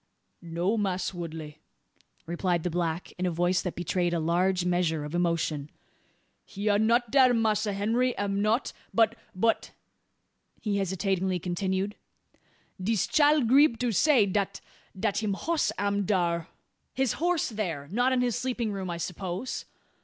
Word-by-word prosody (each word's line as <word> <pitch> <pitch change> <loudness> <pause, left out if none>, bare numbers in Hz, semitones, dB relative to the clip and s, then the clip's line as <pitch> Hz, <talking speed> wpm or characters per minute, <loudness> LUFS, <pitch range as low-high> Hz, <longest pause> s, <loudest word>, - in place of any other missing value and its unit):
"No, 175 +5 -1
Mass' 190 -2 -1
Woodley," 160 -3 -7 0.7
replied 175 0 -1
the 180 - -1
black, 170 0 -2
in 185 - +1
a - - +2
voice 175 +2 +1
that 180 - -4
betrayed 175 0 0
a - - 0
large 180 +3 +1
measure 175 -4 0
of 150 - -7
emotion, 165 -4 0 0.7
"he 205 +2 -6
are 205 0 +3
not 230 +1 +2
dar 255 -3 +5
Massa 215 -2 +1
Henry 230 +5 0
am 200 0 -1
not. 220 +5 +1 0.2
But 225 0 +4 0.2
but," 225 +5 +1 0.9
he 205 -3 -1
hesitatingly 190 -1 0
continued, 190 +3 -2 0.9
"dis 215 +2 +1
chile 295 -1 +4
grieb 255 +1 +5
to 245 -1 0
say 255 0 +4
dat 200 0 -1 0.4
dat 205 0 0
him 205 -3 -1
hoss 330 +8 0
am 200 0 0
dar." 170 -4 +1 0.5
"His 265 -2 +1
horse 345 -4 +1
there! 175 -11 -3
Not 245 +5 +2
in 255 -1 +2
his 245 -3 +1
sleeping 245 -4 -2
room, 190 -2 -4
I 170 - -3
suppose?" 180 +6 -4
195 Hz, 150 wpm, -28 LUFS, 175-225 Hz, 0.9 s, dar